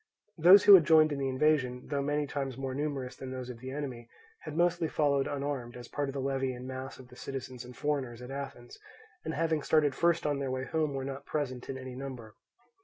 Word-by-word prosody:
Those 185 +5 +9
who 205 - +10
had 185 -4 +10
joined 155 0 +5
in 145 - -2
the 135 -1 0
invasion, 130 -2 +1
though 140 -1 +1
many 145 +1 0
times 135 -3 -4
more 135 -1 -3
numerous 140 -2 -3
than 130 - -7
those 130 -1 -5
of 120 - -11
the 130 +2 -7
enemy, 130 -4 -5 0.3
had 155 - -7
mostly 175 -1 +2
followed 140 -3 +1
unarmed, 135 -4 -3
as 120 -1 -9
part 145 +2 -2
of - - -5
the 140 - -3
levy 135 -1 -1
in 125 +1 -8
mass 130 +1 -6
of 130 -1 -14
the 125 - -14
citizens 130 -2 -6
and 125 0 -12
foreigners 135 -5 -2
at 125 +1 -8
Athens, 135 -3 -7 0.4
and - - -3
having 160 0 +1
started 150 -1 +3
first 170 +3 +2
on 145 -2 0
their 135 -1 -2
way 130 0 -2
home 155 -1 -1
were 135 -1 -3
not 135 0 -6
present 130 -5 -3
in 135 - -3
any 130 -1 -7
number. 125 -5 -7
135 Hz, 230 wpm, -31 LUFS, 130-150 Hz, 0.4 s, who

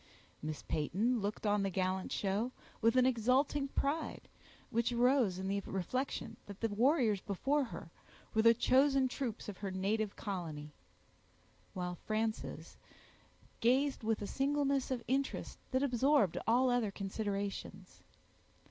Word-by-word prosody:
Miss 155 0 -5
Peyton 210 +11 0
looked 205 +2 -3
on 205 0 +3
the 195 - 0
gallant 185 0 -1
show 205 +5 0 0.3
with 230 +1 +4
an 255 -1 +5
exulting 260 +4 +2
pride, 285 +3 -2 0.4
which 235 +1 +1
arose 240 -5 +3
in 190 0 -3
the 200 +1 0
reflection 250 +9 -3
that 200 -1 -9
the 225 - 0
warriors 230 - +3
before 270 +8 0
her 165 -8 -9 0.4
were 220 - +4
the 230 +1 +6
chosen 265 +2 +4
troops 245 -3 -4
of 205 -3 -7
her 200 - -3
native 200 +3 -1
colony; 160 -7 -5 1.0
while 180 -1 -2
Frances 220 0 -2 0.8
gazed 265 +4 +2
with 220 -1 0
a - - -2
singleness 275 +2 0
of 250 -3 -2
interest 270 +2 -1
that 260 +1 +1
absorbed 255 - +3
all 250 +3 +4
other 245 -4 +2
considerations. 195 -1 -4
225 Hz, 135 wpm, -34 LUFS, 195-260 Hz, 1.0 s, the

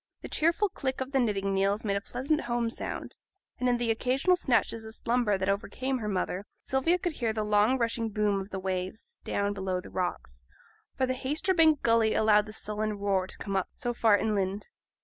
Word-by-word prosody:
The - - -6
cheerful 335 +6 +2
click 265 -6 -3
of 260 +1 -4
the 270 - +2
knitting 200 -5 0
needles 200 +3 +1
made 200 -1 +1
a 200 - -1
pleasant 280 +8 -1
home 240 -1 -1
sound; - - -5 0.4
and 250 - +2
in 245 - +2
the 240 -1 +1
occasional 260 +10 +2
snatches 240 -7 +1
of 220 0 -7
slumber 235 -4 +1
that 190 0 -2
overcame 255 +6 -1
her 215 - -4
mother, 195 0 -2 0.2
Sylvia 265 +7 +2
could 350 0 -2
hear 235 -7 -1
the 215 -1 -1
long 210 +4 +3
rushing 230 -1 -1
boom 210 -2 +1
of 190 - -8
the 195 - -4
waves, 190 - -4
down 200 0 -1
below 190 -2 -2
the - - -11
rocks, 65 - -4 0.5
for 260 - +2
the 255 - 0
Haytersbank 310 +3 +2
gulley 230 -1 +3
allowed 210 -1 +4
the - - -7
sullen 215 0 -2
roar 195 -2 0
to - - -7
come 200 -2 -4
up 190 - 0
so 245 -3 -2
far 225 -3 +4
inland. 200 - -1
220 Hz, 205 wpm, -29 LUFS, 200-255 Hz, 0.5 s, allowed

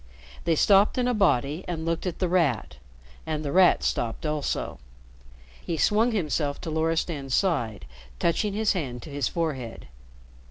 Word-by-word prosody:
They 165 -1 +3
stopped 200 - +4
in 250 -1 +1
a 250 - +2
body 160 - +1
and 165 -2 -4
looked 165 +2 -1
at 175 - -3
The 185 - 0
Rat, 145 - 0 0.5
and 155 -1 -2
The 140 - -2
Rat 185 +1 +5
stopped 115 +5 -2
also. 150 -2 -2 0.8
He 165 - -3
swung 220 +8 +3
himself 150 -7 -1
to 160 - -5
Loristan's 160 -4 -1
side, 120 - 0 0.3
touching 195 - 0
his 215 +1 +1
hand 130 - -4
to 155 - -10
his 140 -4 -1
forehead. 135 -9 -4
160 Hz, 155 wpm, -26 LUFS, 140-185 Hz, 0.8 s, Rat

